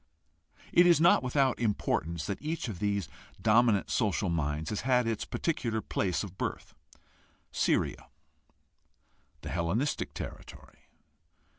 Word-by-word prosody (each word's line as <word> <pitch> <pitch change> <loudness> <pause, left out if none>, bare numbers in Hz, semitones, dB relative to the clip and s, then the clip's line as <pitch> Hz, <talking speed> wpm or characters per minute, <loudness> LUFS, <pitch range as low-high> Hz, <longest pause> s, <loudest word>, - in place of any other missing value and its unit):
It 175 +1 +6
is 170 -3 +5
not 170 +2 +5
without 130 0 +1
importance 85 -7 -1
that 100 - -4
each 155 -2 -3
of 100 -6 -6
these 100 -4 -1 0.3
dominant 110 -2 +3
social 100 -4 +1
minds 80 0 -2
has 105 - -2
had 125 -1 +2
its 115 -1 -2
particular 115 -9 -2
place 95 -3 -1
of 95 -2 -10
birth. - - -4 0.8
Syria, - - 0 1.3
the - - -7
Hellenistic 90 - -1
territory. - - -10
110 Hz, 120 wpm, -30 LUFS, 90-125 Hz, 1.3 s, It